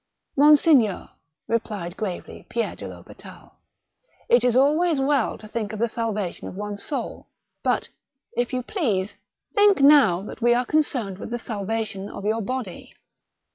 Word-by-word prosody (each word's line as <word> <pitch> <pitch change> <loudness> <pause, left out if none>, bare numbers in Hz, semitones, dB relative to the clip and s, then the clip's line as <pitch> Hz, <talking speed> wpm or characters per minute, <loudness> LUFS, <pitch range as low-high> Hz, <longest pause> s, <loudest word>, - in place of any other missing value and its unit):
" - - -54
Monseigneur," 290 - +4 0.4
replied 210 -6 -2
gravely 195 -5 -6
Pierre 235 -1 -2
de - - -9
THospital: - - -13 0.8
"It 240 0 +5
is 245 -1 +2
always 300 +4 +3
well 270 -2 +1
to 215 - -12
think 215 -1 -4
of - - -4
the 235 +3 +1
salvation 215 -5 -3
of - - -8
one's 205 0 -5
soul; 285 - -5 0.3
but, - - 0 0.5
if 245 0 0
you 255 -1 -2
please, 220 - -1 0.4
think 410 -3 +5
now 275 -11 +6
that 210 - -9
we 240 +1 +4
are 250 +1 +1
con 310 +5 +3
cerned 215 -10 -4
with - - -7
the 240 - -2
salvation 215 -2 -4
of 200 - -8
your 220 +2 +1
body." 240 -4 -5
230 Hz, 160 wpm, -24 LUFS, 205-270 Hz, 0.8 s, now